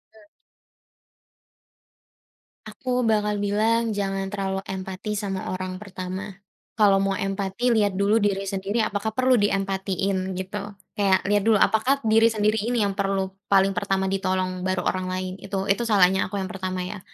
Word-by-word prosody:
E - - -17 2.5
Aku 250 -1 -2
bakal 210 -1 +1
bilang 220 +2 +1
jangan 195 -1 -2
terlalu 195 -1 -2
empati 190 +2 -4
sama 195 -2 -3
orang 185 0 -5
pertama, 190 0 -6 0.4
kalau 200 -3 +5
mau 195 0 0
empati 195 +5 -1
lihat 205 -3 +2
dulu 200 +3 +3
diri 200 -2 0
sendiri 195 +4 -1
apakah 215 +1 -2
perlu 255 0 +4
diempatiin 195 -1 -1
gitu, 200 +2 -5 0.2
kayak 195 -2 +2
lihat 205 0 +2
dulu 225 - +5
apakah 255 +8 +2
diri 225 +1 +5
sendiri 215 -1 +1
ini 230 +1 0
yang 200 -1 -1
perlu 195 -1 0 0.2
paling 195 0 +4
pertama 190 +1 -1
ditolong 185 -1 -1
baru 185 -1 0
orang 185 0 -1
lain 185 0 -3
itu 195 +1 -4
itu 220 +4 +1
salahnya 190 -3 +4
aku 205 - -7
yang 190 +1 -4
pertama 185 -2 -3
ya, 185 +2 -6
195 Hz, 150 wpm, -24 LUFS, 190-210 Hz, 2.5 s, kalau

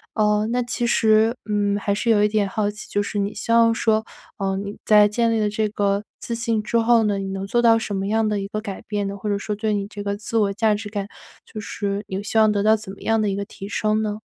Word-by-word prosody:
呃， 210 0 +2
那 245 +1 +1
其 240 0 -2
实， 220 +1 +3
嗯， 205 -1 +1
还 200 0 -1
是 220 +3 -1
有 210 -2 +4
一 - - +5
点 210 -1 +1
好 205 +1 -1
奇， 210 - -9
就 205 - 0
是 205 - -3
你 200 +1 -1
希 - - -4
望 230 0 +5
说， 220 -1 +1 0.3
呃， 195 -1 -1
你 200 +1 -5
在 210 -1 +6
建 230 +2 +1
立 225 - +1
了 210 - +1
这 215 +1 0
个 200 -1 0 0.2
自 235 - -4
信 230 -2 -1
之 235 - 0
后 230 0 +4
呢， 205 -2 +1
你 195 - -4
能 195 0 -4
做 240 +4 +1
到 230 -1 +5
什 220 -2 -4
么 195 0 -2
样 220 +1 +1
的 210 - 0
一 195 - -4
个 215 +1 -4
改 200 -3 -6
变 205 -1 -2
呢？ 200 - -6
或 210 +2 -4
者 200 - +1
说 210 +1 -4
对 215 0 -1
你 200 -1 -1
这 205 -1 -8
个 200 0 -2
自 215 +2 -4
我 200 -2 +2
价 215 +1 +2
值 210 +1 -4
感， 205 -2 -3 0.4
就 215 - -8
是 200 -1 -4
你 195 +1 -4
希 220 - -2
望 215 -1 +6
得 205 -1 +1
到 220 +1 +5
怎 200 -3 -9
么 - - -15
样 225 0 +1
的 210 - +1
一 195 - -1
个 200 - -2
提 195 0 -9
升 215 0 0
呢？ 210 -1 -3
210 Hz, 300 characters per minute, -22 LUFS, 200-220 Hz, 0.4 s, 在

